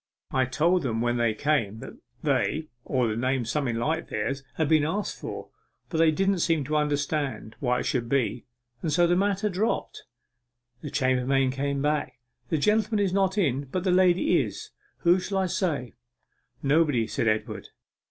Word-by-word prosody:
I 130 Hz, -1 st, +2 dB
told 165 Hz, +8 st, +2 dB
them 115 Hz, -6 st, -1 dB
when 120 Hz, +1 st, +1 dB
they 115 Hz, -2 st, +1 dB
came 120 Hz, -7 st, 0 dB
that -, -, -9 dB, 0.3 s
they, 155 Hz, 0 st, 0 dB
or 125 Hz, -4 st, 0 dB
a -, -, -2 dB
name 130 Hz, +1 st, 0 dB
something 125 Hz, 0 st, -1 dB
like 155 Hz, +8 st, -1 dB
theirs, 135 Hz, 0 st, -2 dB
had 160 Hz, -, +1 dB
been 155 Hz, -1 st, +4 dB
asked 195 Hz, +7 st, -2 dB
for, -, -, -6 dB, 0.4 s
but 160 Hz, -, -2 dB
they 165 Hz, -1 st, +6 dB
didn't 195 Hz, +4 st, +1 dB
seem 165 Hz, -3 st, +1 dB
to 150 Hz, +3 st, -2 dB
understand 145 Hz, -5 st, -1 dB
why 125 Hz, -2 st, +1 dB
it -, -, -5 dB
should 120 Hz, -2 st, -1 dB
be, 130 Hz, -2 st, 0 dB, 0.3 s
and 160 Hz, -, -1 dB
so 175 Hz, +3 st, +4 dB
the 175 Hz, +1 st, +3 dB
matter 200 Hz, +2 st, +1 dB
dropped.' 205 Hz, +3 st, -2 dB, 0.8 s
The 150 Hz, -, -5 dB
chambermaid 130 Hz, -1 st, +1 dB
came 140 Hz, +1 st, -2 dB
back. 150 Hz, -4 st, -1 dB, 0.3 s
'The 160 Hz, -, +1 dB
gentleman 215 Hz, +6 st, +2 dB
is 185 Hz, -, -1 dB
not 195 Hz, 0 st, +1 dB
in, 140 Hz, -7 st, +1 dB
but 175 Hz, +7 st, -3 dB
the 190 Hz, -, +2 dB
lady 180 Hz, -1 st, +4 dB
is. -, -, -6 dB, 0.3 s
Who 175 Hz, +1 st, +4 dB
shall 195 Hz, +2 st, -3 dB
I 190 Hz, -, +2 dB
say?' 160 Hz, -, -2 dB, 0.7 s
'Nobody,' 145 Hz, -4 st, +3 dB
said 115 Hz, -, -2 dB
Edward. 110 Hz, 0 st, -1 dB
150 Hz, 175 wpm, -26 LUFS, 130-175 Hz, 0.8 s, they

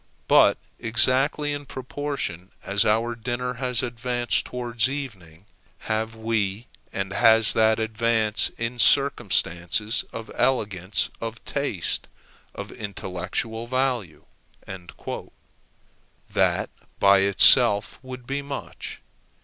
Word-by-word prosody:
But -, -, +6 dB, 0.2 s
exactly 130 Hz, +6 st, +2 dB
in 145 Hz, -1 st, -6 dB
proportion 130 Hz, -, -4 dB
as 100 Hz, +1 st, +2 dB
our 115 Hz, +2 st, +2 dB
dinner 120 Hz, +2 st, -3 dB
has 125 Hz, 0 st, 0 dB
advanced 120 Hz, 0 st, -1 dB
towards 120 Hz, -1 st, -1 dB
evening, 100 Hz, -, -7 dB, 0.4 s
have 110 Hz, 0 st, -2 dB
we 110 Hz, -1 st, -1 dB, 0.3 s
and 95 Hz, 0 st, -3 dB
has 115 Hz, 0 st, +5 dB
that 110 Hz, 0 st, +4 dB
advanced 110 Hz, -1 st, +1 dB
in 115 Hz, +1 st, -3 dB
circumstances 105 Hz, -6 st, +2 dB
of 115 Hz, 0 st, -7 dB
elegance, 105 Hz, -7 st, 0 dB
of 115 Hz, 0 st, -6 dB
taste, 140 Hz, -11 st, -2 dB, 0.5 s
of -, -, -7 dB
intellectual 100 Hz, +3 st, -4 dB
value." 125 Hz, -, -1 dB, 2.1 s
That -, -, +1 dB, 0.3 s
by 100 Hz, 0 st, +6 dB
itself 100 Hz, +2 st, +5 dB
would 130 Hz, -1 st, -9 dB
be 140 Hz, +3 st, -2 dB
much. 140 Hz, -1 st, -7 dB
115 Hz, 100 wpm, -25 LUFS, 105-125 Hz, 2.1 s, But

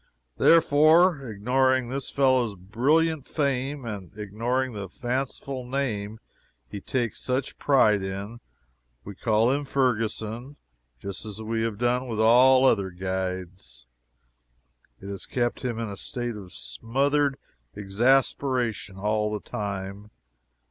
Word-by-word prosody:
Therefore, 160 Hz, -2 st, +5 dB
ignoring 130 Hz, +4 st, +1 dB
this 135 Hz, +1 st, -4 dB
fellow's 130 Hz, -6 st, +2 dB
brilliant 140 Hz, -, +1 dB
fame, 140 Hz, -2 st, -1 dB
and 100 Hz, -6 st, -6 dB
ignoring 115 Hz, +5 st, -2 dB
the 100 Hz, -3 st, -6 dB
fanciful 130 Hz, +2 st, -3 dB
name 110 Hz, -5 st, -3 dB, 0.5 s
he 100 Hz, -, -7 dB
takes 120 Hz, -2 st, -2 dB
such 130 Hz, +1 st, -2 dB
pride 110 Hz, -8 st, +4 dB
in, 100 Hz, +4 st, -5 dB, 0.6 s
we 100 Hz, -, -8 dB
called 110 Hz, +5 st, +2 dB
him 145 Hz, -, -2 dB
Ferguson, 120 Hz, -1 st, -1 dB, 0.4 s
just 100 Hz, +8 st, -6 dB
as 105 Hz, -1 st, -7 dB
we 110 Hz, +1 st, -2 dB
had 115 Hz, -2 st, -2 dB
done 125 Hz, +2 st, 0 dB
with 110 Hz, -3 st, -4 dB
all 130 Hz, +4 st, +6 dB
other 100 Hz, -7 st, +3 dB
guides. 90 Hz, -8 st, -5 dB, 1.1 s
It 100 Hz, -, -10 dB
has 100 Hz, -1 st, -5 dB
kept 120 Hz, -1 st, -1 dB
him 120 Hz, -3 st, -2 dB
in 115 Hz, -1 st, -3 dB
a 100 Hz, -1 st, -7 dB
state 120 Hz, +1 st, -4 dB
of 95 Hz, -3 st, -10 dB
smothered 135 Hz, -, 0 dB, 0.4 s
exasperation 120 Hz, 0 st, +1 dB
all 105 Hz, +1 st, 0 dB
the 105 Hz, -, -2 dB
time. 100 Hz, 0 st, -5 dB
115 Hz, 120 wpm, -26 LUFS, 100-130 Hz, 1.1 s, all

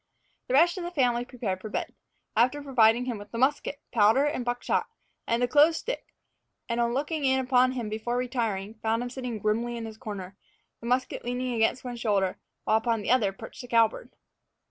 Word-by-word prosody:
The 255 Hz, -, +1 dB
rest 345 Hz, +5 st, +4 dB
of -, -, -5 dB
the 345 Hz, -, -3 dB
family 245 Hz, -7 st, +1 dB
prepared 215 Hz, -8 st, -4 dB
for 215 Hz, -, -6 dB
bed, -, -, -3 dB, 0.4 s
after 255 Hz, +6 st, +2 dB
providing 240 Hz, -3 st, +4 dB
him 240 Hz, -4 st, -3 dB
with 205 Hz, -, -11 dB
the 230 Hz, -, -5 dB
musket, 280 Hz, +2 st, +1 dB
powder 230 Hz, +4 st, +4 dB
and 295 Hz, -4 st, -1 dB
buck 245 Hz, 0 st, -2 dB
shot, -, -, 0 dB, 0.4 s
and 235 Hz, +1 st, +1 dB
the -, -, +3 dB
clothes 300 Hz, +5 st, +5 dB
stick; -, -, -5 dB, 0.5 s
and 235 Hz, 0 st, 0 dB
on 235 Hz, +1 st, +1 dB
looking 295 Hz, +2 st, -2 dB
in 265 Hz, -1 st, +3 dB
upon 255 Hz, 0 st, +3 dB
him 240 Hz, -4 st, -3 dB
before 220 Hz, +3 st, -2 dB
retiring, 225 Hz, -5 st, -2 dB
found 225 Hz, +2 st, 0 dB
him 245 Hz, -, -5 dB
sitting 250 Hz, -3 st, -4 dB
grimly 230 Hz, +3 st, -1 dB
in 230 Hz, -, -5 dB
his 220 Hz, -1 st, -9 dB
corner, 195 Hz, -3 st, -7 dB, 0.4 s
the 235 Hz, -, -7 dB
musket 250 Hz, +1 st, 0 dB
leaning 245 Hz, +1 st, -2 dB
against 225 Hz, +2 st, +1 dB
one 245 Hz, -1 st, -5 dB
shoulder, 200 Hz, -5 st, 0 dB, 0.2 s
while 220 Hz, -, +3 dB
upon 225 Hz, -1 st, 0 dB
the -, -, 0 dB
other 225 Hz, -6 st, +3 dB
perched 195 Hz, -, -10 dB
the 245 Hz, -, -10 dB
cowbird. 230 Hz, -, +2 dB
240 Hz, 205 wpm, -27 LUFS, 220-260 Hz, 0.5 s, clothes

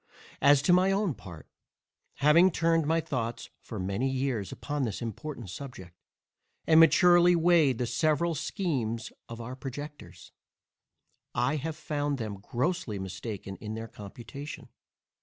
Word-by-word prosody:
As 140 Hz, -1 st, +6 dB
to 175 Hz, -, +4 dB
my 185 Hz, +2 st, +4 dB
own 195 Hz, -4 st, +1 dB
part, 85 Hz, -9 st, -11 dB, 0.7 s
having 155 Hz, +6 st, +5 dB
turned 165 Hz, -2 st, +1 dB
my 165 Hz, +1 st, +3 dB
thoughts 120 Hz, -6 st, -4 dB
for 110 Hz, -, -8 dB
many 100 Hz, +8 st, -1 dB
years 130 Hz, -7 st, -2 dB
upon 145 Hz, 0 st, -4 dB
this 115 Hz, -7 st, -2 dB
important 120 Hz, -, -6 dB
subject, 95 Hz, -9 st, -9 dB, 0.7 s
and 160 Hz, 0 st, +6 dB
maturely 175 Hz, +1 st, +6 dB
weighed 165 Hz, -6 st, +4 dB
the 125 Hz, -, -1 dB
several 155 Hz, +6 st, +1 dB
schemes 135 Hz, -, -2 dB, 0.2 s
of 115 Hz, 0 st, -7 dB
our 120 Hz, +2 st, -6 dB
projectors, 145 Hz, +3 st, -9 dB, 1.0 s
I 125 Hz, +6 st, +1 dB
have 155 Hz, +2 st, -4 dB
always 155 Hz, -, -19 dB
found 145 Hz, -1 st, -1 dB
them 110 Hz, -5 st, -5 dB
grossly 120 Hz, -, -2 dB
mistaken 95 Hz, +1 st, -6 dB
in 110 Hz, 0 st, -6 dB
their 115 Hz, 0 st, -5 dB
computation. 120 Hz, +8 st, -9 dB
135 Hz, 140 wpm, -29 LUFS, 115-160 Hz, 1.0 s, As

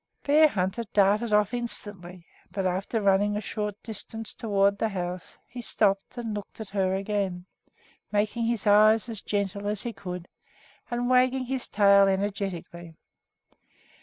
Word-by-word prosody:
Bearhunter 235 Hz, -9 st, +3 dB
darted 210 Hz, +3 st, +3 dB
off 210 Hz, +1 st, +3 dB
instantly; 195 Hz, -7 st, -4 dB, 0.2 s
but 195 Hz, -2 st, -3 dB
after 190 Hz, +5 st, -1 dB
running 205 Hz, +1 st, +2 dB
a -, -, 0 dB
short 210 Hz, -1 st, -4 dB
distance 225 Hz, 0 st, -5 dB
toward 200 Hz, -3 st, +1 dB
the 225 Hz, -, +1 dB
house 180 Hz, -2 st, -5 dB
he 245 Hz, 0 st, -8 dB
stopped 200 Hz, -1 st, 0 dB
and 230 Hz, -3 st, -4 dB
looked 205 Hz, +1 st, -7 dB
at 220 Hz, -3 st, -7 dB
her 190 Hz, -2 st, 0 dB
again, 195 Hz, -3 st, -2 dB, 0.7 s
making 215 Hz, +3 st, 0 dB
his 230 Hz, -2 st, -1 dB
eyes 215 Hz, +2 st, +5 dB
as 220 Hz, -3 st, -5 dB
gentle 200 Hz, 0 st, -2 dB
as 210 Hz, -1 st, -2 dB
he 235 Hz, -, -4 dB
could 180 Hz, -3 st, -7 dB, 0.6 s
and 240 Hz, 0 st, -1 dB
wagging 255 Hz, +1 st, +3 dB
his 260 Hz, 0 st, -2 dB
tail 200 Hz, -1 st, +5 dB
energetically. 190 Hz, -4 st, -3 dB
205 Hz, 140 wpm, -27 LUFS, 195-225 Hz, 0.7 s, eyes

